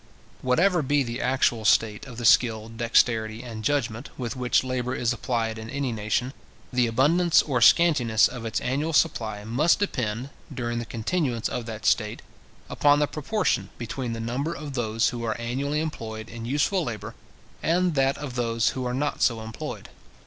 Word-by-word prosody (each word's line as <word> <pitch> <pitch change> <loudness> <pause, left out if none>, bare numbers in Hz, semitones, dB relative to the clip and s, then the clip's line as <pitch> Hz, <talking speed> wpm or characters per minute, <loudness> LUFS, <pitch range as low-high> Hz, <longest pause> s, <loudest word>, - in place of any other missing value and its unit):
Whatever 170 +8 +3
be 145 0 +2
the 120 +1 -4
actual 125 -3 +1
state 110 +4 +2
of 125 -3 -10
the 120 - -4
skill, 110 0 +4
dexterity, 115 0 +1
and 115 -3 -7
judgment, 130 -3 -1
with 125 0 -4
which 125 0 +2
labour 130 0 -2
is 120 0 0
applied 115 -2 -2
in 110 +1 -8
any 135 -1 -2
nation, 110 +4 -1 0.4
the 125 -1 +3
abundance 155 +9 +4
or 130 -5 -1
scantiness 120 -4 +5
of 125 -3 -8
its 115 -1 -2
annual 145 +6 -1
supply 110 -10 +1
must 130 +10 +2
depend, 125 - -2 0.2
during 120 -3 -3
the 120 - -4
continuance 120 0 -1
of 120 -2 -4
that 110 -1 -7
state, 105 -2 +1 0.4
upon 145 0 +3
the 150 - +3
proportion 155 +9 -1
between 120 +1 -4
the 115 - -5
number 130 +9 -2
of 150 -2 -7
those 115 -3 +1
who 120 -1 -5
are 110 -1 -2
annually 135 +5 -2
employed 110 -8 -5
in 115 0 -7
useful 150 +8 +1
labour, 110 -4 -5 0.5
and 175 +1 +2
that 135 -1 +2
of 145 -3 -6
those 115 -2 +1
who 130 - -4
are 125 0 -2
not 145 +2 -2
so 115 -2 +3
employed. 110 0 -7
125 Hz, 175 wpm, -25 LUFS, 115-140 Hz, 0.5 s, scantiness